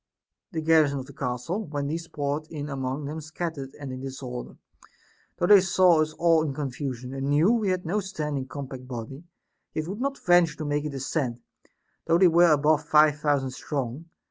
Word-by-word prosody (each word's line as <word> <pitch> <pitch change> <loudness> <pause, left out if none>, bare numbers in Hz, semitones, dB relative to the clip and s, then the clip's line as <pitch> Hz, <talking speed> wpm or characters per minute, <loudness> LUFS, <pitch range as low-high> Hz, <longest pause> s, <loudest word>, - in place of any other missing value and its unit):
The 160 -4 -3
garrison 155 -3 +4
of 130 - -5
the 140 - -13
castle, 135 - -3
when 145 -1 -3
these 165 +3 -3
poured 145 +1 -3
in 150 -2 -6
among 135 +1 -3
them 155 +3 -5
scattered 155 -3 -5
and 140 -2 -6
in 130 - -6
disorder, 130 -2 -7 0.8
though - - +1
they 200 +1 +8
saw 180 -3 +4
us 155 0 -1
all 165 0 +3
in 150 -4 -2
confusion, 130 -2 -4
and 135 +1 -3
knew 155 +8 +4
we 225 -4 +1
had 185 -1 -1
no 190 +6 0
standing 150 -8 -4
compact 130 -2 -7
body, 130 +5 -7 0.5
yet 155 0 -2
would 200 +6 -5
not 275 +1 -1
venture 175 -3 +3
to 155 - -4
make 145 0 -1
a - - -1
descent, 135 -3 -3 0.6
though 165 0 +4
they 185 +1 +6
were 170 0 +5
above 150 +1 +3
five 150 -1 +5
thousand 145 -3 +1
strong. 135 +2 -4
150 Hz, 190 wpm, -26 LUFS, 135-165 Hz, 0.8 s, they